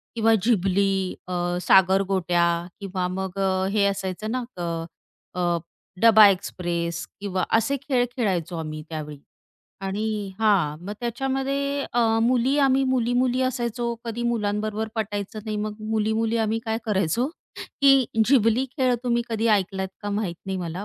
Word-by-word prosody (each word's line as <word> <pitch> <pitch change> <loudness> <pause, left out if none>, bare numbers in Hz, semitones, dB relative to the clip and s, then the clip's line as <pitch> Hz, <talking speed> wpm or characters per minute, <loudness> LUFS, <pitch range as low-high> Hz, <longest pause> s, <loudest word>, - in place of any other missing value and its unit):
किंवा 225 0 +3
झिबली, 195 -3 +2 0.4
अ, 185 - -4 0.3
सागरगोटया 190 -2 +3 0.3
किंवा 185 -2 -2
मग 190 +1 -4
अ, 190 -1 +1
हे 205 -1 +2
असायचं 195 +1 -2
ना, 255 +1 -1
तर 170 -1 -3 0.5
अ, 180 - -3
अ, 175 -1 +1 0.4
डबा 220 -2 +8
एक्सप्रेस 175 -3 -2
किंवा 190 -2 -2
असे 225 +5 0
खेळ 260 -4 +1
खेळायचो 180 -7 -1
आम्ही 155 -1 -5
त्यावेळी 150 -2 -6 0.6
आणि 195 +3 -2 0.3
हां. 195 -9 +2
मग 200 - -4
त्याच्यामध्ये 270 +3 -1
अ, 240 - +2 0.2
मुली 250 +3 +2
आम्ही 270 -1 +4
मुली-मुली 250 0 +1
असायचो, 240 -2 -1
कधी 235 0 -4
मुलांबरोबर 215 -1 -1
पटायचं 205 -1 -3
नाही. 215 -1 -3
मग 210 0 -3 0.2
मुली-मुली 220 +1 +1
आम्ही 220 0 0
काय 225 -1 -1
करायचो, 205 - +1 0.5
की 275 -2 +6 0.2
झिबली 235 0 +3
खेळ 255 -2 +2
तुम्ही 240 -1 +1
कधी 225 0 -1
ऐकलात 190 -2 +1
का 205 - -3
माहीत 200 -4 -2
नाही 190 0 -2
मला, 175 +2 -5
215 Hz, 140 wpm, -24 LUFS, 190-240 Hz, 0.6 s, डबा